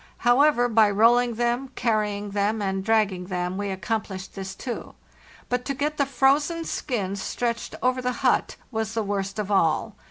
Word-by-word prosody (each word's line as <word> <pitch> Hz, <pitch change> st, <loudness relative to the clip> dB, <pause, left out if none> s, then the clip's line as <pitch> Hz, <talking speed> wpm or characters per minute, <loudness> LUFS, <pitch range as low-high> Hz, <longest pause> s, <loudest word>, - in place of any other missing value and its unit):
However, 245 Hz, 0 st, +5 dB
by 220 Hz, -2 st, +4 dB
rolling 235 Hz, +3 st, +4 dB
them, 240 Hz, +3 st, 0 dB
carrying 210 Hz, -3 st, 0 dB
them, 205 Hz, +2 st, 0 dB
and 190 Hz, -1 st, -1 dB
dragging 210 Hz, -4 st, +1 dB
them 180 Hz, -1 st, -2 dB
we 200 Hz, +1 st, -3 dB
accomplished 190 Hz, 0 st, -4 dB
this 190 Hz, -1 st, -6 dB
too; 245 Hz, -3 st, -6 dB, 0.5 s
but 250 Hz, 0 st, -1 dB
to 275 Hz, -, -2 dB
get 300 Hz, +3 st, -2 dB
the 280 Hz, -, +1 dB
frozen 290 Hz, +5 st, +2 dB
skins 200 Hz, -11 st, -3 dB
stretched 235 Hz, +3 st, -3 dB
over 255 Hz, 0 st, +2 dB
the 250 Hz, 0 st, 0 dB
hut -, -, +2 dB, 0.2 s
was 220 Hz, -1 st, -3 dB
the 225 Hz, -, 0 dB
worst 195 Hz, -1 st, -3 dB
of 210 Hz, -1 st, -3 dB
all. 195 Hz, +3 st, +2 dB
220 Hz, 165 wpm, -25 LUFS, 195-245 Hz, 0.5 s, However